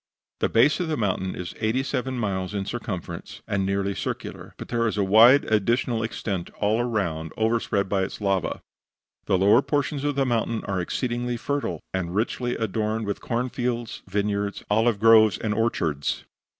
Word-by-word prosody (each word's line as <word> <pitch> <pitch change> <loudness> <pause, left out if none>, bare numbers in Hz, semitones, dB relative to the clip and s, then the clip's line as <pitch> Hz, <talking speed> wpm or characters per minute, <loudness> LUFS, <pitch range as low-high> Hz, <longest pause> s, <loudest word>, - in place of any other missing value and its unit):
The - - +1
base 130 +9 +4
of 180 - -1
the 155 - -1
mountain 95 -4 -1
is 90 -2 -6
eighty 115 +4 +1
seven 130 -1 -2
miles 100 -3 -2
in 100 -1 -2
circumference, 95 -7 -6
and 100 -2 0
nearly 100 0 0
circular; - - -5
but - - -8
there 115 -1 +1
is 105 - -2
a 100 - +2
wide 115 +8 +7
additional 115 +2 +1
extent 100 -5 -3
all 105 +2 +2
around 85 -10 -2
overspread 110 -3 +1
by 95 0 +1
its 95 - -4
lava. 100 -2 -1 0.6
The 95 - +3
lower 100 +6 +5
portions 145 0 -1
of 145 -1 0
the 135 -1 +2
mountain 115 -2 0
are 95 -2 -1
exceedingly 120 +5 -2
fertile, 140 - -2
and 90 -1 -2
richly 120 +3 -1
adorned 110 +1 -1
with 100 -1 -3
corn 125 +1 -1
fields, 120 -2 -3
vineyards, 100 +1 -1
olive 110 0 +3
groves 110 -3 +6
and 110 -2 -1
orchards. 85 -11 -1
110 Hz, 170 wpm, -25 LUFS, 100-120 Hz, 0.6 s, wide